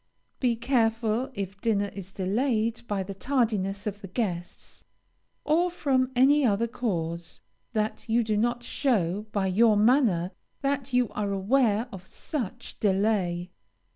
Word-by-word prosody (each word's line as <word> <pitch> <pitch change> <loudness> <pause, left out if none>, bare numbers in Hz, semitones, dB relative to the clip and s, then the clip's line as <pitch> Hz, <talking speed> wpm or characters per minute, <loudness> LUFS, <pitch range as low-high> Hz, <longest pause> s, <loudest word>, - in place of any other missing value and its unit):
Be 245 -3 +2
careful, 230 0 +1
if 195 0 -5
dinner 205 -3 +1
is 195 -1 -8
delayed 225 +4 0
by 200 -2 -1
the 195 +1 -6
tardiness 205 -4 0
of 205 -1 -4
the 195 - -7
guests, 180 -3 -4 0.6
or 335 +4 +3
from 265 -6 +1
any 280 +4 +5
other 225 -2 +2
cause, 170 -9 -3 0.3
that 215 +1 -2
you 235 +1 +3
do 215 -1 0
not 240 +3 0
show 210 - 0
by 200 -2 0
your 210 +3 +4
manner 210 -6 +3 0.3
that 275 -1 -1
you 250 -2 +2
are 205 -1 -2
aware 215 +3 +2
of 190 -1 -10
such 245 - -6
delay. 190 -3 +1
220 Hz, 140 wpm, -27 LUFS, 195-245 Hz, 0.6 s, any